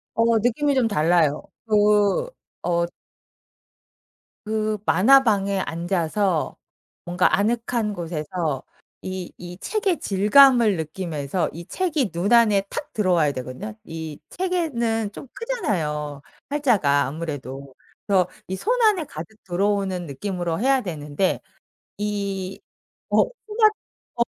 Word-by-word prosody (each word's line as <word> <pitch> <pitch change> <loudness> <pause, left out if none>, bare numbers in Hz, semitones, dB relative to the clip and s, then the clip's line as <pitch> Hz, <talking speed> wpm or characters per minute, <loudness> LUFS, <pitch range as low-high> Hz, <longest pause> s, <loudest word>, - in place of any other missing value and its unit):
어 230 0 +3
느낌이 260 +6 +1
좀 255 -3 +3
달라요. 165 -5 +2 0.3
그 210 - +3 0.3
어 170 -1 +1 1.6
그 215 0 -1
만화방에 200 -2 +4
앉아서 175 0 -1 0.5
뭔가 175 +1 +2
아늑한 225 +1 0
곳에서 165 -4 -3 0.4
이 185 -1 -5
이 175 0 -9
책의 400 - 0
질감을 220 +2 +5
느끼면서 160 0 -2
이 170 +1 -8
책이 305 - -1
눈 175 +7 0
안에 215 -4 +5
탁 - - -5
들어와야 175 -8 +2
되거든요. 130 - -6
이 160 -2 -7
책에는 245 - -1
좀 - - -9
크잖아요, 160 - -2 0.3
활자가 215 - +3
아무래도. 140 -2 -6 0.3
그래서 190 -3 +3 0.2
이 190 - -1
손 485 - 0
안에 415 -8 +3
가득 170 - -10
들어오는 190 -1 0
느낌으로 170 +3 -3
해야 265 +3 +3
되는데 155 -1 -1 0.6
이 200 -2 -3 0.5
어 - - +4 0.2
스마트 430 0 +3 0.4
어 235 - +2
195 Hz, 235 characters per minute, -23 LUFS, 165-235 Hz, 1.6 s, 질감을